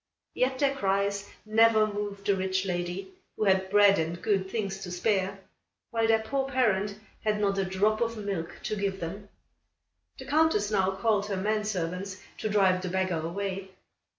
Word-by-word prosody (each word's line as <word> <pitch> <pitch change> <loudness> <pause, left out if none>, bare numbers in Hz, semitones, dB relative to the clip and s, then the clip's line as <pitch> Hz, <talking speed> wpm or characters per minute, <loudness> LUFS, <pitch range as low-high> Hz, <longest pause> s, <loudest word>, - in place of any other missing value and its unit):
Yet 260 +1 +1
their 275 0 +2
cries 200 -2 0 0.2
never 220 0 +5
moved 205 -1 -5
the 200 -1 +3
rich 190 0 -1
lady, 180 - -3 0.3
who - - 0
had 190 -1 +3
bread 205 -1 +6
and 165 +2 -2
good 195 -2 0
things 195 -3 -3
to 195 - -7
spare, 195 +1 0 0.5
while 225 -1 +1
their 225 0 +3
poor 270 +4 -1
parent 210 -6 +1 0.2
had 215 -1 +1
not 200 -1 +1
a 195 - +1
drop 205 +4 +1
of 230 -1 0
milk 195 -6 -4
to 215 - -2
give 195 -1 -2
them. 200 +5 -6 0.9
The 265 - -9
Countess 285 -8 +2
now 190 -2 +2
called 205 0 +1
her 200 -2 -2
men 210 +2 0
servants 190 0 -3 0.2
to 215 - -2
drive 190 -3 +3
the 185 - -3
beggar 185 -2 0
away. 190 +3 -4
200 Hz, 175 wpm, -28 LUFS, 190-215 Hz, 0.9 s, bread